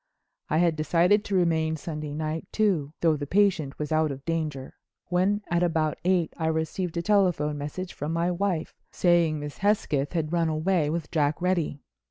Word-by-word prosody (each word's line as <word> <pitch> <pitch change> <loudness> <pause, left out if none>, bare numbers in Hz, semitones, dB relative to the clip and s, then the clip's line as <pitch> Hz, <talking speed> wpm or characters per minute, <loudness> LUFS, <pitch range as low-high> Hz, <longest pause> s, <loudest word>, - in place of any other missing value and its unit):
I 155 - +1
had 170 -1 +3
decided 175 +7 +3
to 200 - -2
remain 160 -3 +2
Sunday 150 -2 -5
night 155 +1 -3
too—though 165 -6 +1
the 145 0 -5
patient 180 -7 +2
was 150 +1 -4
out 155 0 +2
of 135 -1 -7
danger—when 165 +5 -2
at 175 0 +2
about 160 -3 0
eight 180 -3 +1
I 160 - -1
received 160 +2 -2
a 170 - -1
telephone 175 -7 +2
message 175 +6 -5
from 150 +2 -4
my 170 +2 0
wife 180 -2 -1 0.2
saying 170 -3 +2
Miss 145 0 -7
Hesketh 175 -9 +1
had 160 -1 -1
run 165 -2 +2
away 160 0 +1
with 160 -1 -3
Jack 150 -2 +1
Reddy. 175 -5 0
165 Hz, 170 wpm, -26 LUFS, 155-180 Hz, 0.2 s, had